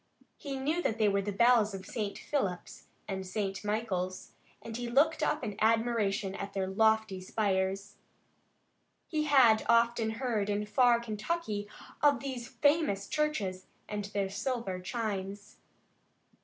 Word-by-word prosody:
He 280 -3 -5
knew 305 +6 0
that 225 - -1
they 215 -1 +3
were 200 -1 +2
the 205 +1 -3
bells 225 -1 +4
of 190 -1 -8
St. 210 -3 -4
Philip's 195 -12 -3 0.2
and 190 -1 -3
St. 195 +1 -3
Michael's, 200 -4 -2 0.3
and 225 - -8
he 240 0 -4
looked 310 +5 +3
up 305 - 0
in 210 -3 -3
admiration 220 -3 +1
at 200 - -6
their 195 -1 -1
lofty 220 0 +2
spires. 195 0 -1 1.1
He 305 -2 -1
had 255 -7 +5
often 235 -1 +3
heard, 225 -6 -1
in 205 +1 0
far 235 +3 +4
Kentucky, 215 0 -3 0.3
of 290 -1 +4
these 260 -3 -5
famous 285 -9 +1
churches 210 -12 -1 0.2
and 210 -1 -4
their 200 -1 -2
silver 220 -3 -2
chimes. 200 0 -4
215 Hz, 140 wpm, -31 LUFS, 195-245 Hz, 1.1 s, had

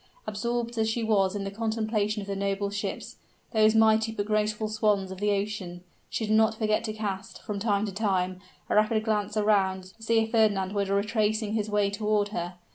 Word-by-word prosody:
Absorbed 235 +2 -2
as 220 0 +2
she 230 +1 -1
was 200 -3 +2
in 200 - -2
the 195 - -4
contemplation 215 -1 -1
of - - -10
the 200 - -2
noble 200 0 -1
ships 205 0 -4 0.3
those 220 -1 +4
mighty 220 0 +4
but 205 -2 -3
graceful 215 0 0
swans 210 -3 +1
of 190 - -7
the 210 +1 +1
ocean 200 -3 -2 0.3
she 220 - -2
did 215 - 0
not 220 0 +4
forget 215 -1 +1
to 220 - -2
cast, 200 -3 -5
from 210 -2 -4
time 205 -1 +1
to 205 - -4
time, 185 -3 0 0.3
a - - -1
rapid 215 +1 +3
glance 215 -1 -1
around, 190 -3 +1
to 225 - -25
see 225 +1 +1
if 220 0 -3
Fernand 205 -4 +2
were 200 -1 0
retracing 210 +2 0
his 215 -1 -1
way 205 -1 +1
toward 210 0 0
her. 175 -3 -4
210 Hz, 200 wpm, -27 LUFS, 200-220 Hz, 0.3 s, those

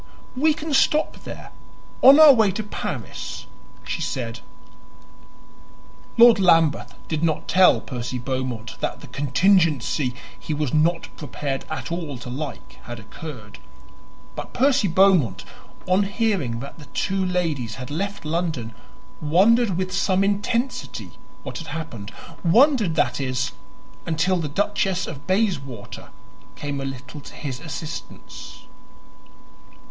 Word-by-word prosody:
"We 300 +4 +3
can 310 -1 -4
stop 300 +3 +2
there - - -8 0.5
on 275 +3 +9
our 310 -3 +10
way 220 -5 +4
to 220 - -3
Paris," 205 - -6 0.4
she - - -4
said. - - -3 1.8
Lord 235 -2 +8
Lambeth 165 -5 +3
did 155 0 -2
not 160 -2 0
tell 185 -1 +5
Percy 125 0 -5
Beaumont 125 -3 -4
that - - -3
the - - -9
contingency 150 -3 +2 0.2
he 155 - -3
was 145 -4 -2
not 165 +2 +1
prepared 140 -2 -4
at 155 - -5
all 165 -6 -4
to 125 0 -8
like 145 +3 -7
had 120 -1 -7
occurred; 110 - -10 0.8
but - - -7
Percy 265 -4 +3
Beaumont, 165 - +3 0.4
on 185 +2 +3
hearing 195 - -1
that 140 +4 -9
the 150 - -11
two 195 +4 -1
ladies 160 -11 -1
had 130 +1 -8
left 200 +3 -3
London, 155 -8 -2 0.5
wondered 195 +6 +4
with 185 0 -2
some 190 0 +2
intensity 210 +6 -2 0.3
what - - -6
had 165 - -8
happened; 145 -10 -6 0.3
wondered, 220 - +4
that - - +1
is, 130 -1 -1 0.6
until 165 +3 +1
the 165 -3 -2
Duchess 195 +2 0
of 145 -2 -9
Bayswater 155 - -2 0.5
came 145 -1 -4
a - - -3
little 135 +2 -7
to - - -12
his 135 -4 -5
assistance. 155 0 -8
165 Hz, 130 wpm, -23 LUFS, 135-195 Hz, 1.8 s, our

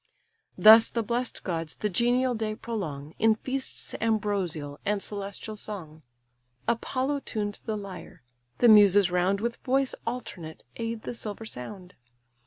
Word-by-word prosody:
Thus 220 +1 +9
the 230 - -1
blest 240 +3 -2
gods 165 -4 -3
the 210 - -1
genial 245 +5 +2
day 220 -2 -2
prolong, 160 -11 -5
In 220 0 +5
feasts 260 +4 -5
ambrosial, 195 -10 -1
and 205 0 0
celestial 200 +2 -5
song. 175 -7 -8 0.7
Apollo 260 +4 0
tuned 210 -6 -3
the 215 -1 -2
lyre; 185 -6 -9 0.3
the 240 - +5
Muses 205 -3 +7
round 180 +2 +2
With 235 +1 -2
voice 265 +1 +1
alternate 185 -9 -6
aid 230 -1 -4
the - - -4
silver 220 -1 -6
sound. 180 - -9
210 Hz, 135 wpm, -27 LUFS, 185-230 Hz, 0.7 s, Thus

